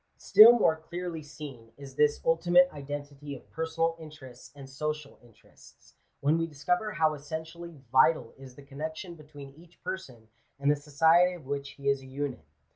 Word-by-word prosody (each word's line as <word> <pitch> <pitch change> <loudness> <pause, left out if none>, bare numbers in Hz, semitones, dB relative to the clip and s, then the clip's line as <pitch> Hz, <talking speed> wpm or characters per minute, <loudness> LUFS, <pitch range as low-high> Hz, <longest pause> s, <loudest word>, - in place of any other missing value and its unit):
Still 225 +3 +8
more 160 -8 +3
clearly 170 +1 -6
seen 140 -6 -11
is 140 -1 -11
this 145 +2 +2
ultimate 175 +2 +4
identity 145 0 -7
of 130 - -14
personal 165 0 -1
interests 145 -6 -12
and 140 -2 -11
social 150 +2 -5
interests, 120 -3 -21 0.3
when 150 +4 +2
we 165 - -1
discover 210 +9 -2
how 155 -5 +2
essentially 160 +3 -8
vital 130 -2 +3
is 135 -2 -13
the 140 - -13
connection 155 +5 -6
between 145 -3 -12
each 170 +3 -20
person 125 -12 -7 0.3
and 140 +1 +2
the - - +2
society 160 +5 +3
of 165 -6 -13
which 140 0 -5
he 140 0 -8
is 140 -1 +2
a 130 - -13
unit. 130 - -5
150 Hz, 165 wpm, -28 LUFS, 140-165 Hz, 0.3 s, Still